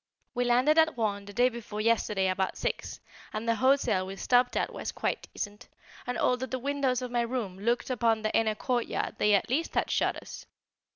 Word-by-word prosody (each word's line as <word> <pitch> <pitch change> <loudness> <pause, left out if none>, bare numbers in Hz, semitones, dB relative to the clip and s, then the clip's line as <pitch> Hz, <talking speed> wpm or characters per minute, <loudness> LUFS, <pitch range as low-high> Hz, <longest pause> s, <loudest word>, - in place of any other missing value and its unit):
We 245 0 0
landed 255 +6 +4
at 320 -4 +3
Rouen 205 -3 -1
the 205 - -9
day 245 +3 +4
before 225 -3 -7
yesterday 215 -3 +2
about 185 0 -1
six, - - -3 0.3
and 215 +2 -4
the 230 - +4
hotel 230 -6 +2
we 195 - -6
stopped 245 +4 +2
at - - -1
was - - -4
quite - - -3
decent, 205 0 -6 0.4
and 250 - -2
although 250 +1 +1
the 260 - -3
windows 265 -1 0
of 250 - -5
my 240 -1 +1
room 230 -6 -3
looked 235 +4 0
upon 225 -3 +1
the 215 - -1
inner 220 -1 +2
courtyard 240 +1 -2
they 210 -1 +4
at 200 - 0
least 320 +6 0
had - - +1
shutters. - - -2
235 Hz, 195 wpm, -29 LUFS, 210-250 Hz, 0.4 s, landed